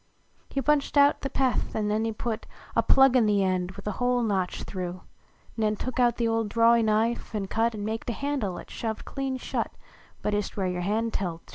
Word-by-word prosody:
He 275 - -2
punched 295 -1 +2
out 285 0 +5
the 275 - -2
peth, 265 -2 0
an 215 -1 0
nen 215 +2 +1
he 225 - 0
put 220 0 -4 0.3
A - - +5
plug 270 -1 +5
in 235 -4 +5
the 205 -1 +3
end 185 -1 0
with 200 - -11
a 210 - -1
hole 245 0 +2
notched 190 -5 -1
through; 180 -1 -5 0.5
Nen 215 -1 +1
took 255 +4 -4 0.2
the 235 - +1
old 225 -1 0
drawey 230 +2 +5
knife 220 +1 0
an 205 -2 -1
cut 225 +3 0
An 205 -1 -4
maked 225 +2 -3
a - - 0
handle 270 -9 -2
at - - -10
shoved 220 -2 -4
clean 270 -1 -3
shut - - -2 0.5
But 210 - 0
ist 205 0 -2
where 190 -2 0
ycr 180 -1 -2
hand 220 +5 0
held 170 -4 -3
to. - - -22
220 Hz, 220 wpm, -27 LUFS, 200-245 Hz, 0.5 s, out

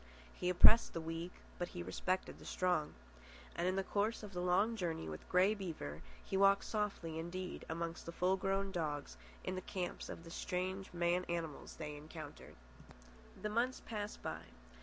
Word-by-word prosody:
He 180 - -1
oppressed 200 +6 +8
the 165 - -1
weak, 165 +2 -3 0.3
but 175 - 0
he 85 - -2
respected 185 - -1
the - - -11
strong. 180 -5 +1 0.6
And 170 +1 +1
in 185 - +2
the 195 - +1
course 210 +4 0
of 205 -2 -7
the 180 - -1
long 190 +6 +3
journey 170 - -2
with 75 -1 -7
Grey 185 +3 +5
Beaver 160 - -5 0.2
he - - -2
walked 195 +1 +6
softly 200 -7 -1
indeed 180 +2 -4
amongst 165 +1 -3
the - - -2
full 180 +2 +3
grown 195 +1 0
dogs 150 - -2 0.3
in - - -1
the 185 - -2
camps 180 -1 -3
of 165 - -6
the 165 - -10
strange 185 +2 -2
man 175 +1 +2
animals 165 -4 -3
they 150 -2 -5
encountered. 155 0 -9 0.9
The 210 - +1
months 235 +4 +1
passed 210 -2 -4
by. - - -3
180 Hz, 175 wpm, -38 LUFS, 165-195 Hz, 0.9 s, oppressed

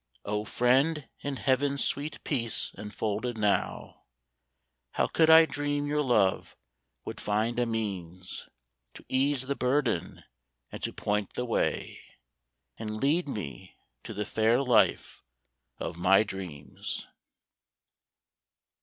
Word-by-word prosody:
Oh, 105 +1 -2
Friend, 135 +7 +2
in 140 -1 -3
heaven's 140 +1 +1
sweet 145 +2 -2
peace 115 -6 -1
enfolded 110 +3 -3
now, 105 -2 -1 0.9
How - - +2
could 160 -1 +3
I 160 0 +9
dream 145 -1 -2
your 150 +1 +1
love 120 -8 +1 0.5
would - - -6
find 110 +3 0
a 120 - +1
means 95 -5 -4 0.5
To - - -12
ease 135 0 +2
the 140 +1 -1
burden 125 - 0 0.5
and - - -7
to - - -2
point 105 -1 -2
the 125 - -1
way. 115 - -1 0.8
And 110 -1 -4
lead 150 +6 +2
me 80 - -6 0.3
to - - -7
the 105 +1 -2
fair 110 +3 +2
hfe 125 -5 +2 0.6
of - - -5
my 95 +4 +5
dreams? 90 -9 -6
120 Hz, 120 wpm, -29 LUFS, 105-140 Hz, 0.9 s, I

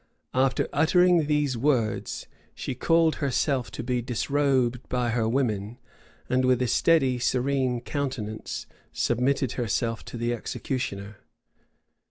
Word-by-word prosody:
After 130 0 +2
uttering 170 +1 +4
these 150 -3 +1
words, 120 -4 0 0.3
she - - -4
caused 165 +4 +2
herself 135 -4 0
to 100 - -6
be 125 0 -1
disrobed 130 0 +1
by 125 -2 0
her 115 -1 +1
women; 115 -3 -1 0.5
and 130 0 +1
with 130 -1 +3
a - - 0
steady 135 -2 +3
serene 130 0 0
countenance 125 -6 -4 0.3
submitted 130 +2 +1
herself 115 -1 -1
to - - -7
the 120 +1 -1
executioner. 105 -4 -4
125 Hz, 120 wpm, -26 LUFS, 120-140 Hz, 0.5 s, uttering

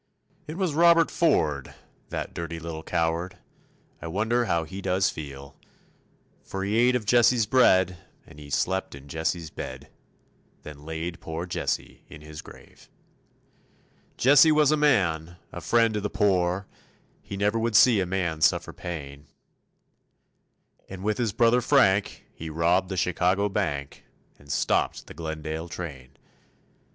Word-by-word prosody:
It 155 +3 -6
was 185 -6 -1
Robert 170 +1 +5
Ford, 75 - +1 0.3
that - - -5
dirty 85 -1 -5
little 80 -1 -6
coward, 85 +2 -2 0.6
I 85 - -6
wonder 110 +7 0
how 85 -5 0
he 95 +5 -8
does 95 0 +1
feel, 70 -2 -9 0.9
For 95 0 -5
he 100 +2 -1
ate 125 +2 +4
of 120 -4 -2
Jesse's 120 0 +4
bread 95 -7 +4 0.3
and 75 -2 -15
he 75 -1 -11
slept 95 +3 -1
in 70 0 -13
Jesse's 80 +2 -3
bed, - - -8 0.7
Then 75 -1 -11
laid 80 +1 -5
poor 80 +2 -5
Jesse 90 - -4
in 75 - -12
his 75 0 -9
grave. - - -16 1.3
Jesse 145 +4 +6
was 150 -1 +4
a - - +4
man, 85 - +1
a - - -7
friend 115 -1 +2
to 105 - -2
the 105 - -2
poor, 95 -2 +1 0.6
He 100 - -7
never 105 +3 +1
would 115 -1 -1
see 115 0 +6
a 90 - -2
man 85 -4 -2
suffer - - +2
pain; 70 -4 -8 1.6
And 95 0 -8
with 105 +2 -1
his 115 -4 0
brother 120 +3 +3
Frank 105 -7 +2
he 80 - -7
robbed 85 +4 +1
the 95 - -4
Chicago 90 +3 +1
bank, 75 -9 -3 0.4
And 70 0 -11
stopped 70 - 0
the - - -11
Glendale 80 +1 -5
train. 70 -7 -8
90 Hz, 145 wpm, -26 LUFS, 80-110 Hz, 1.6 s, Jesse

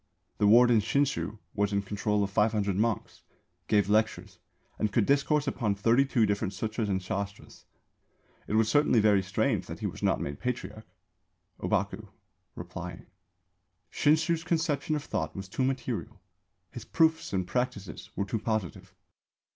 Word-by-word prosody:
The 105 - +4
warden 120 +1 +6
Shinshū 135 -2 0 0.2
was 105 0 0
in 100 0 0
control 105 +1 0
of 100 - -3
500 105 -2 +1
monks, 110 +1 -1 0.5
gave 105 -2 +3
lectures, 110 +2 0 0.4
and 105 - 0
could 110 -2 +2
discourse 145 +1 +2
upon 115 -7 -1
thirty 115 +7 +3
two 120 -4 +2
different 100 -1 -1
Sūtras 110 +2 -2
and 95 -1 +1
Shāstras. 100 +2 -6 0.8
It - - -4
was 110 0 +4
certainly 145 -2 +4
very 105 -2 +4
strange 95 +1 -1
that - - -6
he - - -3
was - - -5
not - - +2
made 70 0 -5
Patriarch. 120 -3 -4 0.7
Ōbaku - - -1 0.5
(replying). 85 -1 -7 0.9
Shinshū's 160 +2 +2
conception 160 -2 0
of 150 - -3
Thought 80 - -3
was 95 -1 -6
too 115 +7 -2
material. 120 -5 -3 0.5
His 120 - -8
proofs 160 +5 +1
and 95 -2 -1
practices 115 -4 -3
were 100 - -1
too 110 +3 -2
positive. 110 - -3
110 Hz, 145 wpm, -29 LUFS, 100-130 Hz, 0.9 s, warden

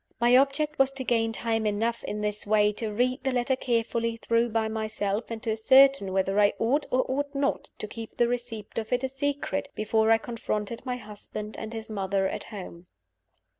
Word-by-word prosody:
My 240 +1 +5
object 280 +3 +2
was 270 0 +5
to 270 -1 -4
gain 225 -2 +1
time 225 -1 0
enough, 225 +3 -1
in 210 - -4
this 210 0 -2
way, 210 0 +4
to 215 0 -4
read 250 +5 0
the 265 - +1
letter 250 +1 +1
carefully 230 -2 -1
through 230 +1 +1
by 220 0 0
myself, 215 -1 -2
and 230 -1 -6
to 225 - 0
ascertain 260 -1 +5
whether 195 +1 +1
I 205 0 +5
ought 275 +6 +1
or 255 +1 +2
ought 285 +2 -2
not 275 0 -1
to 215 - -5
keep 225 +1 -9
the 240 - +4
receipt 235 -3 -4
of 220 - -6
it 250 +1 +1
a - - +2
secret 285 +1 -2
before 220 +1 +2
I 225 - +6
confronted 225 0 -4
my 250 -1 -1
husband 210 -1 -8
and 220 - -6
his 225 -1 -6
mother 195 -2 0
at - - -5
home. 180 -4 -9
225 Hz, 200 wpm, -27 LUFS, 215-255 Hz, -, I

